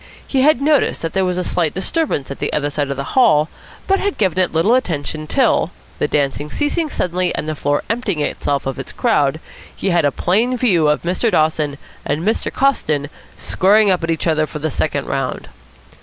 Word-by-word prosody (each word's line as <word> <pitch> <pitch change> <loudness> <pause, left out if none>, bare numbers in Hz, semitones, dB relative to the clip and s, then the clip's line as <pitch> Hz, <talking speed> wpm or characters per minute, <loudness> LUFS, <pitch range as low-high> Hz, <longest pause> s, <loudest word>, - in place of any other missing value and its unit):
He 265 - 0
had 280 -1 +4
noticed 295 - +2
that 165 - -3
there 190 - +1
was 180 -1 -1
a 180 - 0
slight 170 -3 0
disturbance 190 - -1
at 140 - -7
the - - -2
other 145 -1 0
side 145 -1 -2
of 140 - -3
the 140 - -2
hall, 155 - +4 0.4
but 390 0 +2
had 405 -1 -2
given 190 -3 +1
it 185 - +2
little 165 +9 +2
attention 155 - -1
till, 250 - +2 0.3
the - - +1
dancing 145 0 -1
ceasing 300 - -1
suddenly 180 -6 -1
and 150 - -4
the 155 - -1
floor 145 -1 -1
emptying 225 -7 -1
itself 145 -1 -1
of 135 -1 -3
its 135 - -6
crowd, 145 +2 +1 0.4
he 195 - -1
had 170 -1 +3
a 145 - +3
plain 225 - +1
view 185 -11 +3
of 150 - 0
Mr. 185 +7 0
Dawson 155 -4 +1 0.3
and 155 +3 -2
Mr. 220 +4 0
Coston 150 - 0 0.3
squaring 205 +2 +3
up 180 -2 0
at 165 - -2
each 165 - -1
other 155 -2 +1
for - - -7
the 155 +1 -2
second 140 0 -1
round. 135 -2 -3
165 Hz, 205 wpm, -18 LUFS, 150-220 Hz, 0.4 s, had